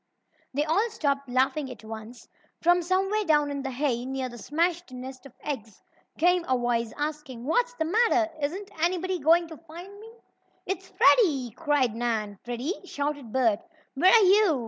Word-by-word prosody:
They 295 +1 +1
all 390 +9 +2
stopped 280 - -1
laughing 265 +3 +1
at 250 - -10
once. 220 +2 -9 0.3
From 350 +1 +4
somewhere 385 +4 +1
down 295 -5 +2
in 280 -1 -3
the 270 - -3
hay, 255 -2 -1
near 260 0 -3
the 240 - -10
smashed 335 - -1
nest 255 +1 -8
of 260 - -20
eggs, 225 -8 -5 0.4
came 355 +1 +3
a 255 - +2
voice, 235 -2 0
asking: 295 -5 -4
"What's 485 - +1
the 320 - -1
matter? 360 -3 +2
Isn't 375 +8 -3
anybody 365 +1 0
going 330 +3 +4
to 320 - -9
find 345 +6 -11
me?" 445 +1 -12 0.5
"It's 380 0 -4
Freddie!" 285 - +4
cried 285 -3 +1
Nan. 220 -4 -2
"Freddie!" 245 - -4
shouted 285 -8 -4
Bert. 230 -5 +2 0.3
"Where 355 +7 +5
are 455 -2 +7
you?" 380 -6 +5
295 Hz, 170 wpm, -27 LUFS, 255-355 Hz, 0.5 s, are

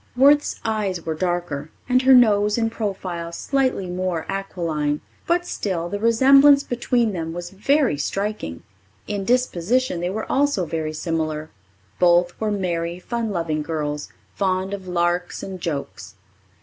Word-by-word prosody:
Worth's 290 +3 +4
eyes 205 -6 -1
were 160 - -1
darker, 175 -3 -2 0.2
and 255 0 +3
her 265 0 +6
nose 210 -3 +4
in 225 -1 0
profile 185 -6 -4
slightly 260 +1 0
more 180 -2 -2
aquiline. 165 -7 -2 0.3
But 350 +1 +1
still, 175 - -3
the 205 - -3
resemblance 275 +5 +6
between 240 -2 0
them 165 -2 -4
was 175 0 -6
very 240 - +1
striking. 195 - -3 0.4
In 200 -2 -3
disposition 250 -2 +1
they 175 +1 -1
were 215 +3 -3
also 275 -9 +1
very 155 -1 -3
similar. 155 -1 -3 0.5
Both 175 0 +4
were 215 - +1
merry, 175 -4 -2
fun 230 +4 -3
loving 165 -5 -1
girls, 150 -2 -3 0.2
fond 190 0 -1
of 190 -2 -6
larks 175 0 -1
and 190 -2 -7
jokes. 150 -5 -5
185 Hz, 140 wpm, -22 LUFS, 170-225 Hz, 0.5 s, her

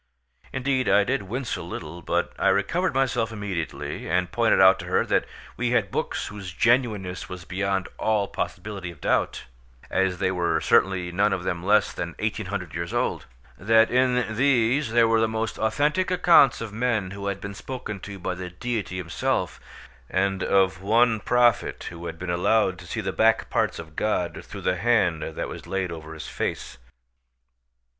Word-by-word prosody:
Indeed 130 -2 0
I 100 +1 +5
did 130 +5 0
wince 125 +2 -2
a - - -6
little; 85 - -7
but - - -1
I - - +2
recovered 180 -3 +1
myself 125 -4 +1
immediately, 85 -9 -4
and 90 +1 0
pointed 115 -1 +3
out 95 0 +7
to - - -7
her - - +2
that - - +1 0.3
we - - 0
had - - +1
books - - -2
whose 100 -3 -7
genuineness 110 -6 +1
was 90 -2 -8
beyond 95 +2 -1
all 105 -2 +1
possibility 100 -4 -5
of 85 -4 -12
doubt, - - 0 0.5
as 95 -1 +1
they 95 0 0
were 90 -2 +1
certainly 90 -2 +2
none 100 +4 +2
of 90 - -3
them 90 -2 -2
less 105 +2 +3
than 85 -1 -5
1800 100 -5 -3
years 85 0 -4
old; - - -1 0.3
that 110 +3 +4
in 125 -3 +2
these 130 0 +2
there 115 0 +5
were 115 0 +3
the 110 - +3
most 110 0 -3
authentic 150 +10 +1
accounts 170 -9 +5
of 110 -2 -6
men 110 -4 0
who 100 0 -5
had 100 -1 -2
been 100 0 -6
spoken 105 -2 -6
to 100 +1 -8
by 95 0 -3
the 90 0 -6
Deity 105 0 -4
Himself, 85 -2 -2 0.5
and 95 0 0
of 95 -2 +2
one 110 +2 +3
prophet 120 +1 +2
who 85 0 -7
had 85 0 -6
been 90 +1 -4
allowed 95 +1 +2
to 90 - -11
see 110 - -3
the 95 -2 -3
back 110 0 +2
parts - - +1
of 80 -2 -10
God 90 -4 -1
through - - -9
the 90 0 0
hand 95 -6 +2
that 80 +1 -4
was - - -9
laid 95 -2 -2
over 80 -1 -8
his 80 - -7
face. - - -4
100 Hz, 180 wpm, -25 LUFS, 90-115 Hz, 0.5 s, out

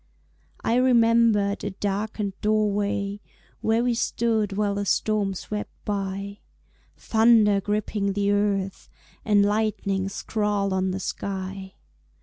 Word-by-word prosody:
I 230 - +2
remembered 230 -5 +3
a 205 - -1
darkened 205 +1 -3
doorway 205 -1 0 0.4
Where 225 +2 +2
we 245 -1 +1
stood 225 -3 0
while 205 0 0
the 200 0 -2
storm 205 0 +1
swept 210 +3 -5 0.2
by, 200 0 -3 0.6
Thunder 220 -3 +4
gripping 205 -1 -1
the 200 0 +1
earth 200 -2 -1 0.3
And 205 -2 +4
lightning 205 -2 0
scrawled 205 -1 -1
on 190 0 0
the 185 +1 -3
sky. 190 0 -5
205 Hz, 115 wpm, -25 LUFS, 195-215 Hz, 0.6 s, Thunder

